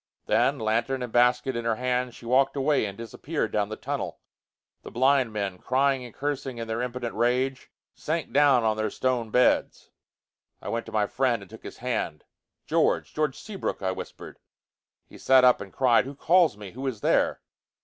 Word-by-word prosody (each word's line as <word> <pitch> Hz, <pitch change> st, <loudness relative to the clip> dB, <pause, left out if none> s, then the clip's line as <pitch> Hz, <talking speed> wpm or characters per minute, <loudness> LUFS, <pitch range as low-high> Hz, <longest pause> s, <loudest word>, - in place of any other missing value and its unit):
Then, 140 Hz, -, +2 dB
lantern 115 Hz, +3 st, -1 dB
and 120 Hz, -, -7 dB
basket 125 Hz, +1 st, +3 dB
in 120 Hz, -, -3 dB
her 115 Hz, -1 st, +1 dB
hands, 125 Hz, 0 st, -1 dB
she -, -, -13 dB
walked 130 Hz, +4 st, +2 dB
away 140 Hz, -2 st, +2 dB
and 100 Hz, -1 st, -6 dB
disappeared 130 Hz, +7 st, -4 dB
down 105 Hz, -1 st, 0 dB
the 110 Hz, -, -4 dB
tunnel. -, -, -4 dB, 0.6 s
The -, -, -9 dB
blind 130 Hz, 0 st, +2 dB
men, 100 Hz, -3 st, -3 dB
crying 135 Hz, 0 st, +1 dB
and 120 Hz, -, -9 dB
cursing 135 Hz, -1 st, -4 dB
in 115 Hz, -1 st, -5 dB
their 110 Hz, +1 st, -2 dB
impotent 125 Hz, -1 st, -4 dB
rage, 125 Hz, +3 st, 0 dB, 0.2 s
sank 160 Hz, +1 st, -3 dB
down 140 Hz, -4 st, +5 dB
on 110 Hz, -1 st, +1 dB
their 110 Hz, 0 st, -1 dB
stone 125 Hz, -1 st, -1 dB
beds. 125 Hz, +3 st, +1 dB, 0.7 s
I -, -, -7 dB
went 115 Hz, 0 st, -3 dB
to -, -, -8 dB
my 105 Hz, -1 st, +1 dB
friend, 120 Hz, -2 st, 0 dB
and 95 Hz, -, -16 dB
took 110 Hz, -, -11 dB
his -, -, -10 dB
hand. 120 Hz, -10 st, -3 dB, 0.4 s
"George! -, -, +1 dB
George 150 Hz, -3 st, -1 dB
Seabrook!" 200 Hz, -, -5 dB
I 95 Hz, -, +1 dB
whispered. 95 Hz, -, -9 dB, 0.7 s
He -, -, -15 dB
sat 130 Hz, -1 st, +5 dB
up 125 Hz, -1 st, +5 dB
and 100 Hz, -1 st, -8 dB
cried, 125 Hz, -1 st, +3 dB
"Who 140 Hz, +2 st, -8 dB
calls 165 Hz, -, +3 dB
me? 105 Hz, -3 st, -9 dB
Who 130 Hz, +5 st, -5 dB
is 115 Hz, -6 st, -4 dB
there?" -, -, +2 dB
125 Hz, 190 wpm, -26 LUFS, 110-135 Hz, 0.7 s, down